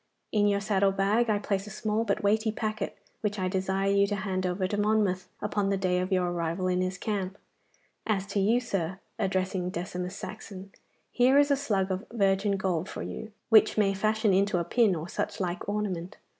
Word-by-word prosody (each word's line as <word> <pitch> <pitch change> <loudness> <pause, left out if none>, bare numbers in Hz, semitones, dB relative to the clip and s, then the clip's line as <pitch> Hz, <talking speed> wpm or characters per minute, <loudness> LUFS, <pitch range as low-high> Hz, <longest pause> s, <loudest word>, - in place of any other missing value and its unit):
In 205 -1 +3
your 200 0 +2
saddle 200 -1 +2
bag 205 +5 +2
I 210 - +3
place 200 -1 -2
a - - -6
small 215 +2 -1
but 200 -2 -1
weighty 215 +2 +2
packet, 215 -1 -3 0.2
which 210 -1 -2
I 185 -1 0
desire 190 +1 0
you 200 0 +4
to 205 - -1
hand 190 -2 -2
over 185 +1 -1
to 205 - -2
Monmouth 205 -3 +1
upon 205 -1 0
the 195 - +1
day 185 -1 +1
of 185 +2 -2
your 180 -2 +2
arrival 170 +1 -2
in 180 0 +1
his 185 +1 -2
camp. 195 -2 -3 0.7
As 200 -3 +1
to 205 - +1
you, 220 +5 +3
sir,' 190 -7 -2 0.2
addressing 185 -1 0
Decimus 180 +1 -4
Saxon, 195 -2 -8 0.4
'here 255 +3 +4
is 285 0 +5
a - - +5
slug 205 -9 0
of 190 +4 -3
virgin 200 -2 +2
gold 185 -2 -1
for - - -5
you, 220 - -6 0.2
which 220 -1 +6
may 200 -2 +3
fashion 215 +1 +1
into 195 0 +2
a 170 - +1
pin 215 0 +3
or 160 +1 -5
such - - -3
like 180 0 -3
ornament. 195 -3 -3
195 Hz, 200 wpm, -28 LUFS, 185-210 Hz, 0.7 s, which